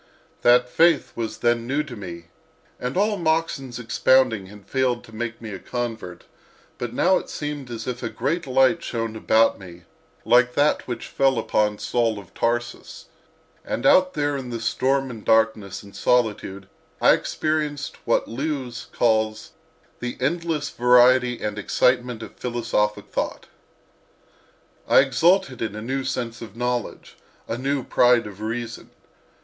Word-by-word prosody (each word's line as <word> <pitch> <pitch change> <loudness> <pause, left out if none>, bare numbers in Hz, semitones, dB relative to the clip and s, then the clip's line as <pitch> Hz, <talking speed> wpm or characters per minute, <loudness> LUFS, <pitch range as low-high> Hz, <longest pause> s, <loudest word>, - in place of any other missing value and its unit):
That 125 +1 +5
faith 165 +4 +3
was 115 -1 -4
then 120 0 +1
new 140 +4 0
to 135 -5 -9
me, 85 -5 -9 0.5
and 125 +6 -3
all 205 +1 +2
Moxon's 160 -7 -1
expounding 125 -3 +2
had 100 0 -14
failed 130 -2 0
to 110 - -16
make 120 +1 -4
me 115 -2 -8
a 95 - -6
convert; 115 -6 -5 0.6
but 120 -2 -3
now 185 +9 +3
it - - -11
seemed 145 -3 -5
as 115 -2 -6
if 125 -1 -4
a - - -3
great 150 +6 -2
light 135 +6 +3
shone 115 -2 -3
about 110 +1 +3
me, 90 -2 -12 0.4
like 125 +2 +4
that 145 +1 +2
which 120 - -5
fell 135 -2 +1
upon 105 -2 +1
Saul 115 -2 0
of 100 -4 -12
Tarsus; 120 +1 -3 0.5
and - - -4
out 185 0 +5
there 145 -1 0
in 130 -3 -5
the 120 -1 -4
storm 135 +4 0
and 110 -3 -9
darkness 110 -3 +1
and 100 -1 -14
solitude 105 -5 0 0.3
I - - +6
experienced 150 -2 -2
what 115 - +1
Lewes 130 -1 -4
calls 110 -2 0 0.5
"The 120 0 -5
endless 155 +1 -1
variety 125 0 +4
and 105 0 -3
excitement 125 +2 +1
of 105 - -11
philosophic 115 -3 -1
thought." - - -3 1.4
I - - +7
exulted 140 +1 +2
in 110 -2 -3
a 105 - -6
new 135 +3 -2
sense 120 -2 -4
of 110 -3 -9
knowledge, 120 -1 -3 0.3
a 115 - -2
new 135 +2 -1
pride 120 -2 +3
of 105 0 -10
reason. 115 +1 -5
120 Hz, 150 wpm, -23 LUFS, 110-135 Hz, 1.4 s, I